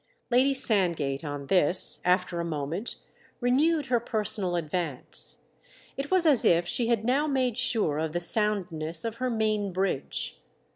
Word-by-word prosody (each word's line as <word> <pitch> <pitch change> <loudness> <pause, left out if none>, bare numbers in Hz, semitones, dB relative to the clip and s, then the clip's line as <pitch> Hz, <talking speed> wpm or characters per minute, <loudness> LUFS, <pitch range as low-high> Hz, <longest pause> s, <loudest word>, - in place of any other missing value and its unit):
Lady 255 +3 +4
Sandgate, 170 - 0
on 145 -2 -5
this, 180 +2 +3
after 180 -1 +1
a - - -1
moment, 165 - -3 0.4
renewed 285 +5 +2
her 245 -2 +2
personal 210 -5 -1
advance; 165 -4 -3 0.5
it 275 +1 -4
was 370 -2 +3
as 290 -6 +4
if 170 +1 +3
she 235 +4 0
had 230 -2 +1
now 275 +5 +2
made 260 -5 0
sure 220 -11 +1
of 160 0 -2
the 175 - -1
soundness 175 -4 -2
of 230 0 -4
her 255 +1 -1
main 215 -3 0
bridge. 185 -6 -2
200 Hz, 150 wpm, -27 LUFS, 170-245 Hz, 0.5 s, Lady